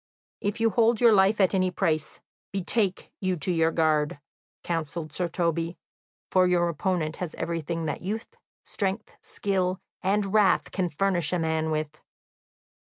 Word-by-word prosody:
"If 205 +1 -2
you 225 0 +3
hold 230 0 +3
your 235 -2 +6
life 200 +2 +4
at 190 -1 +4
any 185 -1 +2
price, 160 -5 -1 0.3
betake 195 0 -1
you 185 -1 +1
to 165 +4 +1
your 165 -1 +3
guard," 155 -3 +1 0.4
counselled 165 -1 -3
Sir 180 - -1
Toby, 170 0 -1 0.5
"for 185 -1 +4
your 175 -1 +2
opponent 170 -1 -1
has 175 -4 -5
everything 165 0 -3
that 150 - -3
youth, 220 - -5 0.3
strength, 200 +1 -3
skill, 185 -2 -1 0.2
and 195 +1 0
wrath 210 -3 +3
can 185 -2 -1
furnish 175 -1 0
a 180 - +1
man 160 -1 0
with." 155 -1 -3
180 Hz, 150 wpm, -26 LUFS, 160-195 Hz, 0.5 s, your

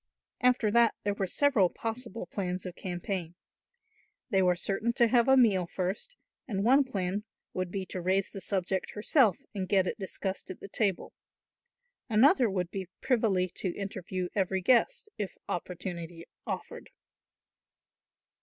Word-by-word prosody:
After 250 -4 +3
that 235 +1 +4
there 205 - +1
were 195 -1 -2
several 235 -5 +3
possible 225 -2 -5
plans 180 -1 -3
of 180 - -5
campaign. 175 -1 -4 1.0
They 195 -2 +4
were 180 -1 +4
certain 205 +6 -1
to 235 - +4
have 240 +1 +4
a 265 0 +6
meal 200 -8 +4
first 190 - -3 0.3
and 200 -5 -1
one 265 +5 +6
plan 200 -5 -2 0.3
would 185 -1 -2
be 190 +1 -3
to 180 0 -5
raise 190 +2 +1
the 195 - -7
subject 190 -1 -1
herself 215 - +3
and 190 -3 -3
get 190 -2 +4
it - - -3
discussed 190 0 -4
at 185 - -7
the - - -8
table, 200 -3 -1 1.0
another 245 - +5
would 180 -3 -2
be 190 -2 -5
privily 220 -8 +2
to 185 -3 -2
interview 185 -2 -4
every 190 -2 0
guest, 345 - +3
if 200 -3 -4
opportunity 175 -1 -5 0.2
offered. - - -5
195 Hz, 145 wpm, -30 LUFS, 185-225 Hz, 1.0 s, a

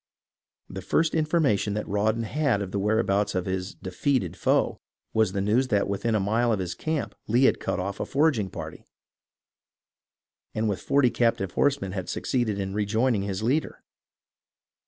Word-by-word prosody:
The - - -7
first 165 0 +1
information 150 - +1
that 105 - -3
Raw 105 +2 +2
don 115 +1 -3
had 130 -3 0
of 95 - -7
the 100 - -1
whereabouts 105 -1 +1
of 95 - -1
his 95 0 -3
"defeated" 95 - -1
foe - - +1 0.3
was 110 -3 +2
the 95 - -2
news 115 +6 +2
that 105 -5 +1
within 100 +3 -1
a - - +2
mile 115 +5 +1
of 110 - +2
his 90 -2 -3
camp 155 -2 -3
Lee 120 +4 +3
had - - +4
cut - - -2
off 100 +2 -4
a - - -1
foraging 140 -9 +2
party - - -8 1.7
and 110 +1 0
with 100 -3 -2
forty 140 -3 +3
captive 115 -6 +1
horsemen 140 -9 +1
had 95 -1 -5
suc - - -4
ceeded 120 -6 0
in 95 -1 -3
rejoining 110 +2 +1
his 100 0 -3
leader. 140 +7 -1
105 Hz, 175 wpm, -26 LUFS, 100-125 Hz, 1.7 s, had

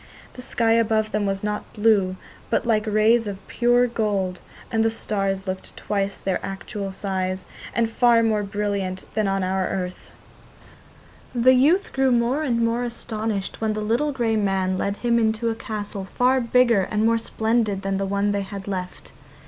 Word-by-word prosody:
The 250 - -9
sky 230 -2 0
above 220 -1 +2
them 210 -1 0
was 195 0 -2
not 210 0 -3
blue, 205 -4 +3 0.3
but - - +1
like 220 -2 +1
rays 215 +2 +3
of 195 -1 -7
pure 240 +1 +3
gold, 205 -6 -1 0.3
and 225 -1 +2
the 225 - +3
stars 195 -3 -1
looked 185 -1 -6
twice 200 -1 -2
their 190 -2 -1
usual 195 0 -5
size, 190 -1 -3 0.3
and 230 -1 +2
far 235 0 +4
more 215 -2 +2
brilliant 200 -2 -2
than 215 -1 +1
on 195 0 0
our 190 0 0
earth. 185 -1 -4 1.3
The 250 +2 +5
youth 305 +10 +3
grew 265 -1 +2
more 240 +4 +2
and 235 -6 +1
more 230 +1 0
astonished 220 -4 -3
when 220 -1 +1
the 215 - -3
little 240 +8 +1
grey 235 -5 0
man 190 -2 +1
led 200 +2 -2
him 235 -1 +2
into 225 +1 +1
a - - -1
castle 210 -3 -5
far 255 +6 +2
bigger 235 -3 +4
and 215 0 +1
more 230 0 +3
splendid 220 -3 0
than 195 0 -1
the 195 - -1
one 200 +1 +1
they 200 0 0
had 195 0 -7
left. 185 -2 -5
215 Hz, 175 wpm, -23 LUFS, 195-230 Hz, 1.3 s, The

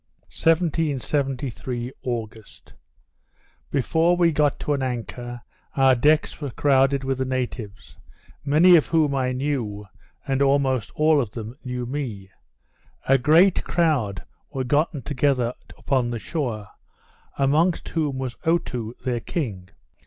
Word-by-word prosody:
_ - - -43 0.2
1773 135 -6 0
August 115 -3 -6 1.0
Before 165 +6 +2
we 170 -1 +4
got 150 -2 +1
to 150 - 0
an 140 - -1
anchor, 120 -1 -5 0.3
our 135 -1 +5
decks 150 +6 +2
were 145 - -3
crowded 135 +1 +2
with 135 0 -2
the - - +1
natives; 125 -5 -5 0.4
many 165 +6 +6
of 160 - +4
whom 155 -4 +2
I 130 -2 0
knew, 125 -6 -3 0.4
and 135 0 0
almost 135 -4 +2
all 155 -1 +4
of 120 - -4
them 115 +1 -7
knew 125 -1 -4
me. 120 -8 -5 0.8
A 135 0 +5
great 165 +8 +4
crowd 130 - 0 0.3
were 130 - -3
gotten 145 +1 0
together 130 -3 0 0.2
upon 130 -4 0
the 120 - -3
shore; 115 - -4 0.7
amongst 155 +6 +2
whom 150 -5 -1
was 130 -2 -4
Otoo 125 -9 -1
their 125 -2 0
king. 105 - -4
135 Hz, 130 wpm, -23 LUFS, 120-150 Hz, 1.0 s, many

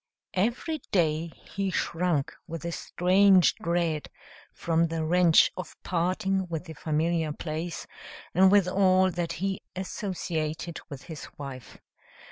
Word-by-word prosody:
Every 240 - 0
day 160 -3 +2
he 195 +4 -5
shrunk 170 -5 0
with 165 0 -6
a 170 - -2
strange 185 +2 +4
dread 170 -3 -1 0.4
from 165 0 +1
the 160 -1 -2
wrench 170 0 +5
of 185 - -7
parting 185 +2 0
with 165 0 -4
the 160 - -8
familiar 160 +1 0
place 160 +2 -4 0.5
and 190 +2 +6
with 200 -3 +5
all 185 0 +4
that 170 -1 -2
he 195 +2 -2
associated 170 -4 -3
with 140 -3 -8
his 160 -4 -8
wife. 135 -4 -8
170 Hz, 125 wpm, -28 LUFS, 160-185 Hz, 0.5 s, and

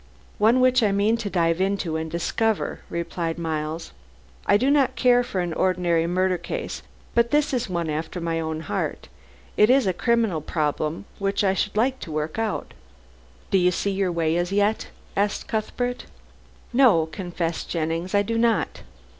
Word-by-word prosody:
"One 230 +5 +4
which 255 0 +4
I 210 -3 +3
mean 205 +3 +2
to 225 -3 -4
dive 165 -1 +1
into 195 -4 0
and 160 0 -3
discover," 205 +6 -1
replied 170 -1 -3
Miles. 160 0 -3 0.6
"I 205 - +6
do 260 +6 +2
not 275 -3 +3
care 245 -1 +4
for 195 -6 -2
an 175 -2 -2
ordinary 175 -2 +1
murder 185 0 +1
case, 170 - -5 0.3
but 235 0 +3
this 295 +1 +2
is 245 -4 -1
one 170 -2 -1
after 160 +3 -3
my 165 -1 -1
own 160 -1 -3
heart. - - -3 0.5
It 210 - +6
is 265 -1 +5
a 190 - +1
criminal 225 -5 +1
problem 155 +3 -2
which 200 +1 0
I 190 -1 +3
should 205 +2 -2
like 260 +4 +2
to 160 - -7
work 155 +5 -3
out." 225 -2 -2 0.8
"Do 195 - +4
you 180 0 +4
see 200 +3 -1
your 190 -2 0
way 165 -1 +1
as 175 +1 -1
yet?" 205 +2 +1 0.3
asked 205 +1 0
Cuthbert. 245 +3 -2 0.7
"No," 235 -11 +5
confessed 170 0 -4
Jennings, 165 +3 -2
"I 205 - +4
do 230 +2 -1
not. 230 -1 +1
190 Hz, 170 wpm, -24 LUFS, 165-225 Hz, 0.8 s, I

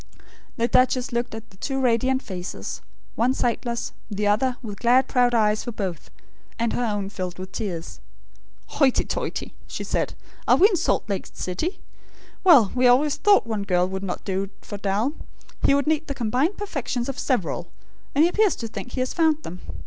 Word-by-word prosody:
The 235 - +2
duchess 255 +2 +3
looked 240 -1 -2
at 225 0 -10
the 190 - -19
two 270 +6 -2
radiant 260 +1 +2
faces; 180 -2 -6 0.3
one 250 +3 +1
sightless; 235 -1 -1 0.2
the 210 -1 -2
other, 245 +5 +2
with 205 -3 -7
glad 250 +2 +4
proud 245 -1 +3
eyes 215 -1 +2
for 240 - -4
both; 190 -8 -4 0.5
and 230 0 0
her 245 - 0
own 205 -4 -1
filled 185 -3 -5
with 185 0 -7
tears. 175 -7 -5 0.7
"Hoity 270 -4 +2
toity!" - - -3
she - - -5
said. - - -1 0.3
"Are - - +7
we 400 - +7
in 400 - +1
Salt 345 -9 +1
Lake 200 -2 -3
City? 250 - -3 0.6
Well, 280 - +7
we 255 0 +4
always 275 +4 +4
thought 405 - +5
one 220 -3 -2
girl 180 -2 +2
would 190 0 -4
not 190 -2 -4
do 195 0 -1
for 205 - -7
Dal; 205 +8 0 0.5
he 275 - +4
would 280 - +1
need 315 0 +1
the 280 - -3
combined 260 - 0
perfections 270 - -3
of 275 0 -4
several; 245 - -1 0.5
and 295 - +6
he - - +6
appears 415 +2 +3
to 230 - -5
think 245 +2 -7
he 255 - -1
has 255 - -1
found 315 -2 +2
them. 180 -3 -7
240 Hz, 185 wpm, -24 LUFS, 205-270 Hz, 0.7 s, Are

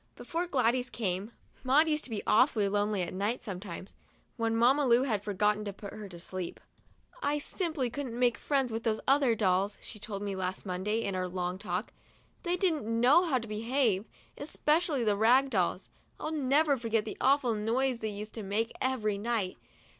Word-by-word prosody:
Before 340 +2 -3
Gladys 250 -4 +1
came, 200 0 -3 0.3
Maud 280 +5 +4
used 305 -1 0
to - - -9
be 220 -3 -3
awfully 220 -3 +4
lonely 205 -1 0
at 175 - -5
night 205 +6 -1
sometimes, 190 -2 -7 0.4
when 225 -1 0
Mamma 265 +4 +4
Lu 240 +1 +5
had 215 -7 -1
forgotten 210 +1 +1
to 200 - -4
put 200 +1 -9
her 215 -2 -8
to 175 - -10
sleep. 180 +1 -6 0.6
"I 290 +1 +1
simply 295 - -2
couldn't 255 -3 -5
make 245 -3 +2
friends 270 -4 0
with 225 +1 -2
those 220 -1 0
other 270 -3 +4
dolls," 195 -1 +1
she 215 - -7
told 200 -1 -5
me 200 -1 -3
last 185 +1 -3
Monday, 200 +5 -1
in 200 - -2
our 185 0 -1
long 180 0 -3
talk. 180 +2 -3 0.5
"They 355 -1 0
didn't 340 - +1 0.2
know 280 +9 +6
how 290 -6 +2
to 230 -2 -5
behave, 220 -1 +1 0.3
especially 300 -1 +1
the 210 -2 +2
rag 250 +6 +4
dolls. 185 -2 0 0.3
I'll 310 - -3
never 290 0 +2
forget 225 -2 0
the 215 - -6
awful 265 -3 +3
noise 235 +4 0
they 220 - -2
used 210 +1 -6
to 225 - -6
make 210 +3 -1
every 215 -6 0
night. 215 -4 -1
225 Hz, 185 wpm, -30 LUFS, 200-265 Hz, 0.6 s, know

